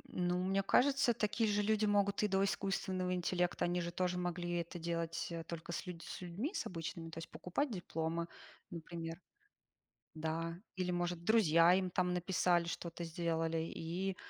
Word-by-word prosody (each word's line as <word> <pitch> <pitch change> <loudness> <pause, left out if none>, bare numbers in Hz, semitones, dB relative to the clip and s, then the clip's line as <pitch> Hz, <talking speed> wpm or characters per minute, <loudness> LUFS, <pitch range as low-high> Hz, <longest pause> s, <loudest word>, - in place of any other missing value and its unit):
Ну, 180 0 +1
мне 195 +1 +2
кажется, 270 -3 +4
такие 215 0 +1
же 205 0 +2
люди 215 0 +2
могут 200 0 +2
и - - +3
до 195 0 +2
искусственного 190 -2 0
интеллекта. 180 0 +1
Они 175 0 0
же 170 0 -3
тоже 180 0 0
могли 175 0 -2
это 170 +1 -3
делать 170 0 -2
только 170 0 -6
с 185 - -3
людь 170 -2 -6
с - - -7
людьми 190 - -3
с - - -2
обычными, 165 -1 -5
то 165 - -7
есть 165 - -7
покупать 270 +10 -1
дипломы, 170 -3 -2 0.4
например, 165 0 -6 0.9
да. 165 +2 -2 0.2
Или, 180 -1 0
может, 175 -1 -1
друзья 175 -5 +6
им, 185 -1 +1
там, 180 0 +1
написали, 175 -1 +2
что-то 170 0 -4
сделали. 165 0 0 0.2
И, 180 +4 -2
175 Hz, 165 wpm, -36 LUFS, 170-190 Hz, 0.9 s, друзья